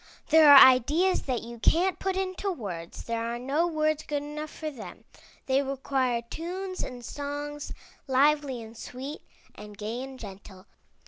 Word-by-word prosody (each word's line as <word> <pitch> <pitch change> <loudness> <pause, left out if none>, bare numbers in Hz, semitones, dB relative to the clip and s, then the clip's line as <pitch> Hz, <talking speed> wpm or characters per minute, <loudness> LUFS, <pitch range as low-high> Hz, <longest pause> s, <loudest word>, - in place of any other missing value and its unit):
There 315 -2 +8
are 285 - +11
ideas 285 +9 +6
that 250 -4 -1
you 235 0 -9
can't 360 +9 +2
put 380 -1 -1
into 385 +1 -2
words; 180 - -7
there 230 0 -3
are 235 +1 -3
no 280 +7 0
words 310 -2 0
good 290 -2 -3
enough 300 +1 -6
for 310 0 -6
them. 235 -7 -11 0.4
They 265 +1 +2
require 265 -3 -1
tunes 370 +6 -5
and 245 -2 -7
songs, 290 +1 -5 0.4
lively 275 -2 +2
and 225 +1 -12
sweet, 265 +6 -7 0.3
and 210 -1 -11
gay 220 +4 -4
and 265 0 -8
gentle. 195 -2 -11
275 Hz, 155 wpm, -27 LUFS, 235-310 Hz, 0.4 s, are